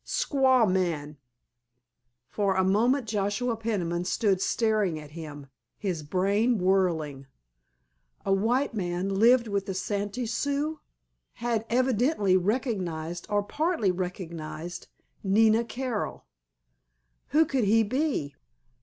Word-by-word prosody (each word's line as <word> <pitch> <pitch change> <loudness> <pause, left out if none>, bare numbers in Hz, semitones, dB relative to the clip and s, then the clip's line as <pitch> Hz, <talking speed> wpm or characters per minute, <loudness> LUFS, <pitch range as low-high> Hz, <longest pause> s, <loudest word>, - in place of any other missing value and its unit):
"Squaw 265 - +3
man." 165 -6 -1 1.1
For 200 +2 0
a 190 - +3
moment 230 +7 +2
Joshua 210 +3 -1
Peniman 185 -7 -2
stood 190 0 +1
staring 210 -7 +1
at 150 -1 -12
him, 150 -3 -8 0.3
his 185 -6 -3
brain 200 +9 +1
whirling. 170 -8 0 1.0
A 195 - +2
white 235 +8 +1
man—lived 195 +6 +2
with 200 -2 -2
the 190 - -3
Santee 205 +5 -2
Sioux! 285 +6 -1 0.5
Had 230 -2 -2
evidently 245 - +2
recognized—or 185 - -1
partly 300 - 0
recognized—Nina 180 +5 -1
Carroll! 245 -2 -4 1.0
Who 315 +2 +4
could 265 -6 0
he 225 +3 +4
be? 255 - -1
205 Hz, 100 wpm, -27 LUFS, 180-235 Hz, 1.1 s, Who